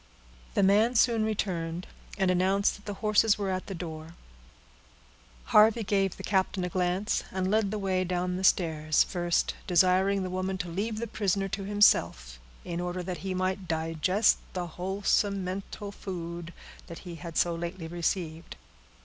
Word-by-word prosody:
The -, -, +3 dB
man 215 Hz, +5 st, +4 dB
soon 230 Hz, -1 st, +4 dB
returned, 180 Hz, -5 st, -2 dB, 0.3 s
and 190 Hz, -2 st, +2 dB
announced 190 Hz, +3 st, +2 dB
that 205 Hz, -, -16 dB
the 205 Hz, -1 st, -4 dB
horses 215 Hz, 0 st, +4 dB
were 200 Hz, -2 st, -2 dB
at 185 Hz, 0 st, -3 dB
the 195 Hz, -, -5 dB
door. 160 Hz, -1 st, -7 dB, 1.4 s
Harvey 220 Hz, +2 st, +6 dB
gave 195 Hz, -2 st, 0 dB
the -, -, -9 dB
captain 190 Hz, -1 st, 0 dB
a 180 Hz, -, -2 dB
glance, 180 Hz, +3 st, 0 dB
and 190 Hz, 0 st, -1 dB
led 215 Hz, -2 st, +2 dB
the 215 Hz, -, -3 dB
way 190 Hz, -2 st, 0 dB
down 180 Hz, 0 st, -1 dB
the 185 Hz, -, -4 dB
stairs, 155 Hz, -4 st, +3 dB
first 175 Hz, -2 st, 0 dB
desiring 185 Hz, +2 st, +3 dB
the 185 Hz, -, -4 dB
woman 185 Hz, +1 st, -2 dB
to 180 Hz, -2 st, -4 dB
leave 210 Hz, +6 st, -3 dB
the 230 Hz, -, -2 dB
prisoner 200 Hz, -3 st, -1 dB
to 195 Hz, +1 st, -4 dB
himself, 85 Hz, -, +3 dB, 0.3 s
in 170 Hz, 0 st, -3 dB
order 180 Hz, 0 st, -3 dB
that 180 Hz, -2 st, -5 dB
he 185 Hz, +3 st, -3 dB
might 185 Hz, 0 st, -2 dB
digest 165 Hz, +5 st, +2 dB, 0.2 s
the 180 Hz, -1 st, -2 dB
wholesome 195 Hz, +3 st, 0 dB
mental 195 Hz, +2 st, -5 dB
food 170 Hz, -3 st, -6 dB, 0.4 s
that 170 Hz, -, -8 dB
he 175 Hz, -, -7 dB
had 170 Hz, -1 st, -7 dB
so 175 Hz, -, +2 dB
lately 170 Hz, 0 st, -5 dB
received. 170 Hz, -1 st, -3 dB
185 Hz, 165 wpm, -28 LUFS, 175-200 Hz, 1.4 s, Harvey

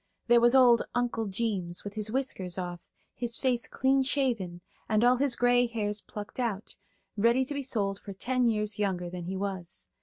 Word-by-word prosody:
There 240 Hz, 0 st, +5 dB
was 240 Hz, +2 st, +5 dB
old 245 Hz, -3 st, +6 dB
"Uncle 240 Hz, -2 st, -1 dB
Jeems," 190 Hz, -4 st, -2 dB
with 205 Hz, -, -6 dB
his 215 Hz, 0 st, 0 dB
whiskers 195 Hz, -9 st, -1 dB
off, 175 Hz, -2 st, -5 dB, 0.3 s
his 235 Hz, -1 st, -2 dB
face 250 Hz, -3 st, 0 dB
clean 270 Hz, +1 st, +2 dB
shaven, 240 Hz, -11 st, -1 dB, 0.3 s
and 215 Hz, +1 st, +2 dB
all 250 Hz, +1 st, +5 dB
his 275 Hz, 0 st, +2 dB
gray 245 Hz, 0 st, +3 dB
hairs 210 Hz, -3 st, -2 dB
plucked 210 Hz, +3 st, -9 dB
out, 220 Hz, -4 st, -3 dB, 0.4 s
ready 235 Hz, +5 st, +3 dB
to 290 Hz, -, -3 dB
be 285 Hz, -, -2 dB
sold 200 Hz, -7 st, -1 dB
for 200 Hz, -, -9 dB
ten 250 Hz, +5 st, 0 dB
years 210 Hz, -2 st, 0 dB
younger 180 Hz, -4 st, -1 dB
than 180 Hz, -1 st, -6 dB
he 190 Hz, +2 st, -4 dB
was. 180 Hz, -, -5 dB
220 Hz, 185 wpm, -29 LUFS, 195-245 Hz, 0.4 s, old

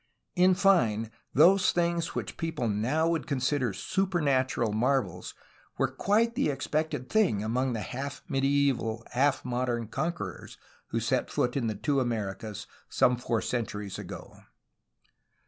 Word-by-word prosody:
In 185 Hz, 0 st, +5 dB
fine, 120 Hz, -, +3 dB, 0.2 s
those 185 Hz, +8 st, +5 dB
things 170 Hz, -1 st, 0 dB
which -, -, -4 dB
people 160 Hz, -7 st, -2 dB
now 120 Hz, +10 st, +1 dB
would 165 Hz, -2 st, -1 dB
con 140 Hz, -3 st, -1 dB
sider 130 Hz, -2 st, +1 dB
supernatural 135 Hz, -, 0 dB
marvels 110 Hz, -6 st, 0 dB, 0.4 s
were -, -, +1 dB
quite 225 Hz, +4 st, +2 dB
the 265 Hz, -, +1 dB
expected 150 Hz, 0 st, -2 dB
thing 190 Hz, -, +2 dB
among 125 Hz, +4 st, 0 dB
the 110 Hz, -, -3 dB
half 135 Hz, +7 st, -5 dB
medieval, 135 Hz, -5 st, +1 dB
half 135 Hz, +2 st, +1 dB
modern 120 Hz, -2 st, -1 dB
conquerors 145 Hz, -, -4 dB, 0.3 s
who -, -, -1 dB
set -, -, 0 dB
foot 125 Hz, -, 0 dB
in 130 Hz, -5 st, 0 dB
the 110 Hz, -, -2 dB
two 145 Hz, +3 st, 0 dB
Americas, 110 Hz, -4 st, -3 dB, 0.2 s
some 125 Hz, -1 st, +3 dB
four 120 Hz, -2 st, -1 dB
centuries 105 Hz, -5 st, -3 dB
ago. -, -, -9 dB
130 Hz, 135 wpm, -28 LUFS, 115-160 Hz, 0.4 s, In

